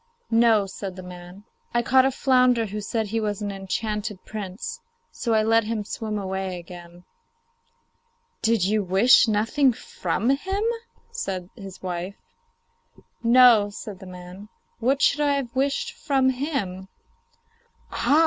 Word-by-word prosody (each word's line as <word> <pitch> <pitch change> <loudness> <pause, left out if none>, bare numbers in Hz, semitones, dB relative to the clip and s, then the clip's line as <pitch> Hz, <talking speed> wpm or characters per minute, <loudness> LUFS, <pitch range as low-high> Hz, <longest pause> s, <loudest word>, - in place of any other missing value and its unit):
'No,' 225 -3 +4
said 190 0 -7
the 185 - -9
man. 180 +2 -11 0.3
'I 240 - +3
caught 260 +2 +5
a - - 0
flounder 250 -3 +3
who 210 0 -5
said 220 +1 -2
he 225 +2 -2
was 210 -1 -2
an 205 - -2
enchanted 205 +1 -4
prince, 215 - -6 0.3
so 230 -2 -1
I 215 - +3
let 225 0 +3
him 220 -1 -2
swim 215 +1 -4
away 190 -2 -3
again.' 175 0 -12 1.4
'Did 225 -4 +2
you 210 +2 +2
wish 195 +7 +5
nothing 225 +6 +2
from 220 0 -2
him?' 385 +9 -1 0.5
said 185 -1 -4
his 195 -5 -11
wife. 180 +1 -4 1.1
'No,' 235 -3 +6
said 205 -1 -8
the 190 - -11
man; 180 +3 -10 0.3
'what 265 +4 +1
should 295 - +3
I 290 -1 +3
have 260 -4 -3
wished 280 - 0
from 275 - +1
him?' 230 - -3 1.0
'Ah! 295 - +3
215 Hz, 140 wpm, -24 LUFS, 190-250 Hz, 1.4 s, No